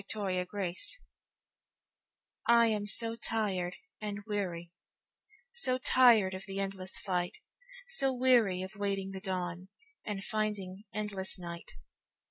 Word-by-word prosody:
Supplication 190 - -3 1.4
I 235 0 +7
AM 210 -1 -1
so 230 +2 +3
tired 195 -6 -1 0.3
and 205 -1 -4
weary, 180 -5 -3 0.8
So 260 - +3
tired 240 -7 +6
of 190 0 -6
the 195 0 -4
endless 195 -1 -4
fight, 180 -2 -1 0.5
So 275 - +4
weary 245 -8 +4
of 190 +3 -7
waiting 195 -1 -1
the 190 -1 -6
dawnAnd 190 - -5
finding 210 -2 -2
endless 200 -2 -3
night. 170 -1 -8
200 Hz, 105 wpm, -32 LUFS, 185-220 Hz, 1.4 s, I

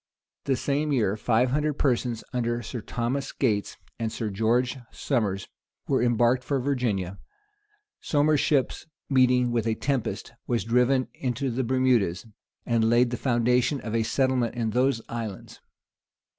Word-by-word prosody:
The 135 - +2
same 145 +4 -1
year, 110 -7 +2
five 120 +3 +1
hundred 150 +2 +1
persons, 120 -4 0
under 120 -1 -1
Sir 115 +2 -5
Thomas 125 +5 -2
Gates 105 -7 -1 0.2
and 115 -1 -2
Sir 110 -1 -3
George 120 +6 +1
Somers, 105 -8 -1 0.4
were - - +2
embarked 120 +1 +2
for 140 +1 -1
Virginia. 115 -9 -1 0.8
Somers's 150 0 +2
ship, 140 -4 +2 0.4
meeting 125 -2 +4
with 115 -1 0
a 110 - +1
tempest, 135 -2 -2 0.2
was 120 -1 0
driven 125 +3 +2
into 130 +1 -2
the 130 +3 -1
Bermudas, 120 -7 +1 0.4
and 115 -2 +2
laid 120 +1 +4
the - - -1
foundation 125 +3 +1
of 110 - -5
a 115 - +2
settlement 125 +1 +1
in 115 -2 -1
those 125 0 +1
islands. 115 -4 -6
120 Hz, 145 wpm, -26 LUFS, 115-130 Hz, 0.8 s, meeting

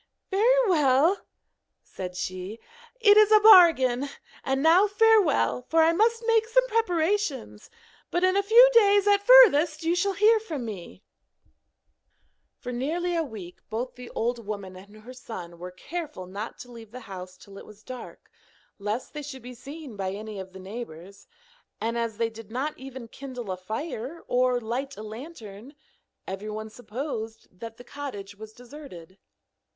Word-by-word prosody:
'Very 485 +5 +3
well,' 310 +1 +3 0.6
said 180 -1 -8
she, 185 +4 -5 0.4
'it 420 -3 +6
is 430 0 +6
a 430 - +8
bargain; 325 - +6 0.3
and 270 +1 -1
now 350 +6 +5
farewell, 410 - +3
for 325 0 +4
I 325 +1 +4
must 455 +5 +1
make 450 -1 +2
some - - +3
preparations; 355 - -1 0.4
but 350 - -1
in 370 +1 +3
a 400 - +3
few 460 +5 +7
days 410 -3 +5
at 405 -1 +4
furthest 350 -10 +6
you 330 +1 +1
shall 390 +3 0
hear 435 +3 +4
from 315 - -6
me.' 200 -2 -9 1.5
For 250 - -7
nearly 330 +8 -2
a 335 - +1
week 215 - -8
both 235 +4 -4
the 250 -1 -11
old 235 +1 -2
woman 200 -3 -6
and 200 +3 -14
her 250 +3 -10
son 180 -9 -9
were 180 +1 -7
careful 300 - -7
not 200 +5 -7
to 245 - -12
leave 230 -2 -12
the 250 +3 -10
house 185 -3 -9
till 195 0 -13
it - - -12
was 210 0 -16
dark, 255 -1 -10 0.5
lest 210 +5 -4
they 300 - -5
should 270 -4 -9
be 250 +1 -9
seen 275 +1 -10
by 190 -1 -3
any 210 0 -7
of 190 0 -8
the 190 - -12
neighbours, 195 -2 -9 0.5
and 230 +1 -2
as 230 -2 -2
they 230 0 -1
did 225 -1 -12
not 265 +6 -3
even 260 -2 -10
kindle 250 -4 -8
a - - -2
fire 240 - -6
or 250 0 +2
light 250 +4 -4
a 215 - -8
lantern, 225 0 -10 0.5
everyone 215 +3 -6
supposed 225 -1 -6
that 225 +4 -10
the 245 - -12
cottage 240 -8 -8
was 215 +1 -11
deserted. 235 - -13
250 Hz, 165 wpm, -26 LUFS, 215-340 Hz, 1.5 s, a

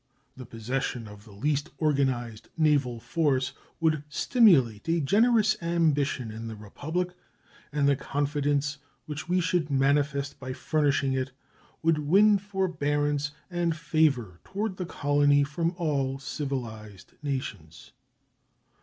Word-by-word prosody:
The 130 -2 -10
possession 120 0 -3
of 105 +1 -13
the 110 - -14
least 145 +9 -1
organized 130 -7 0
naval 145 -7 +2
force 130 +2 0 0.3
would 155 -3 +1
stimulate 150 - +3
a 170 +1 +2
generous 215 - +3
ambition 150 -8 +1
in 110 +1 -7
the 110 - -6
Republic, 160 - -4 0.6
and 145 -1 +2
the 140 - +4
confidence 145 +1 -1 0.3
which 150 +2 -6
we 180 +1 +3
should 165 -2 0
manifest 140 +1 +1
by 130 0 -5
furnishing 140 -2 +1
it 130 0 -2 0.5
would 165 -1 +3
win 200 +7 +5
forbearance 150 -7 -1 0.2
and 170 -2 0
favor 145 - +1
toward 200 0 -3
the 180 - -4
colony 145 -2 +3
from 165 +4 -2
all 140 -6 0
civilized 120 -8 -6
nations. 130 - -5
145 Hz, 120 wpm, -27 LUFS, 130-165 Hz, 0.6 s, win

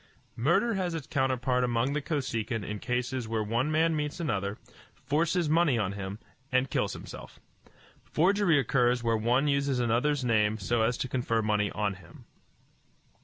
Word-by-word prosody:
Murder 170 - +2
has 180 -4 -1
its 155 -5 -5
counterpart 130 -3 0
among 120 +2 +1
the 150 - -1
Kosekin 115 -7 -2
in 105 +1 -5
cases 125 0 -2
where 110 -1 -1
one 120 +7 0
man 160 +1 +2
meets 150 +2 -3
another, 100 - -2 0.4
forces 160 +5 0
money 155 -4 +3
on 100 -4 0
him, 100 0 -5 0.3
and 130 0 +1
kills - - 0
himself. - - -10 0.6
Forgery 180 0 +2
occurs 125 -2 +2
where 115 -1 +2
one 120 +6 +2
uses 140 -2 +1
another's 125 +4 +1
name 110 -2 +2
so 110 +3 0
as 115 +2 +1
to - - -2
confer 115 -3 0
money 105 -1 +1
on 105 -1 -1
him. 90 -3 -15
125 Hz, 160 wpm, -29 LUFS, 110-150 Hz, 0.6 s, money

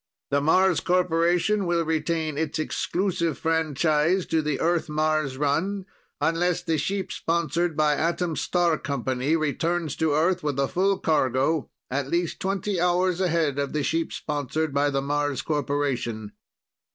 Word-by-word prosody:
The 140 0 +2
Mars 185 +4 +4
Corporation 180 +2 +2
will 170 -1 +1
retain 160 -1 -1
its 155 0 -2
exclusive 170 -1 -1
franchise 160 +2 +1
to 160 -1 +1
the 150 -2 -2
Earth 170 -1 +1
Mars 155 -3 0
run, 175 +8 0 0.3
unless 165 +3 +1
the 165 -3 0
ship 195 +6 -2
sponsored 170 0 -1
by 150 -1 +3
the - - -2
Atom 170 0 0
Star 170 +2 +1
Company 135 +1 -1
returns 160 0 -1
to 160 -2 +1
Earth 175 +4 +2
with 145 -4 -2
full 195 +2 +2
cargo 140 -1 +1 0.2
at 135 +1 -1
least 170 +1 -1
twenty 195 0 -1
hours 180 +1 +2
ahead 160 -6 +1
of 140 -1 -2
the 150 -1 0
ship 165 +3 -1
sponsored 150 +1 -2
by 145 +1 +2
the 135 -1 -1
Mars 145 -2 -1
Corporation. 140 -7 -2
160 Hz, 145 wpm, -25 LUFS, 145-175 Hz, 0.3 s, Mars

